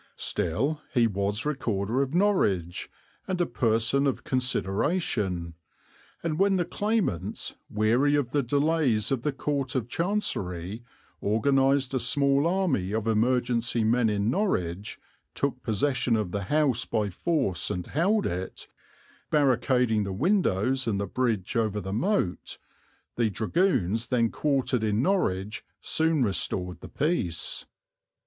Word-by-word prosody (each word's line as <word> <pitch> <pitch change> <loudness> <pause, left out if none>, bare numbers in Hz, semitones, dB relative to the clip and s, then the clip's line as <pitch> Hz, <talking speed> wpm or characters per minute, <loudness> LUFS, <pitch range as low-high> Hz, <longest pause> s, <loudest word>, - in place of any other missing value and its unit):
Still 140 - -1
he 120 -2 +5
was 100 +1 -1
Recorder 120 -5 -1
of 140 +3 -2
Norwich 100 - +1 0.4
and 185 -1 -2
a 175 - +3
person 115 +3 +1
of 135 - -2
consideration, 105 - -1 0.7
and 165 -1 -2
when 195 0 +4
the 175 -2 +1
claimants, 205 - -2 0.2
weary 120 +7 +2
of 140 -4 0
the 145 - +2
delays 140 -4 +1
of 135 -3 0
the 150 - 0
Court 140 -1 -2
of 120 -4 -1
Chancery, 110 - -2 0.4
organized 135 +5 +2
a 130 - +1
small 140 +4 +2
army 165 - 0
of 110 -1 -1
emergency 120 +1 +1
men 115 +1 +3
in 105 +2 0
Norwich, 100 - -1 0.4
took 135 -2 -1
possession 120 +2 +1
of 105 -5 -1
the 100 0 -3
house 140 -1 +2
by 105 -2 -1
force 130 - 0
and 90 -1 -3
held 200 - +1
it, 90 +2 -4 0.6
barricading 125 -5 +2
the 100 - -4
windows 130 - +1
and 100 -3 0
the 100 - -1
bridge 115 0 -1
over 110 -3 +1
the 95 0 -5
moat, 115 - -1 0.6
the 115 -2 +2
dragoons 115 - 0
then 115 -3 +1
quartered 135 -5 0
in 110 +2 +1
Norwich 105 - 0 0.2
soon 160 -3 +2
restored 90 -3 -1
the - - -9
peace. 135 - -1
125 Hz, 130 wpm, -27 LUFS, 105-145 Hz, 0.7 s, he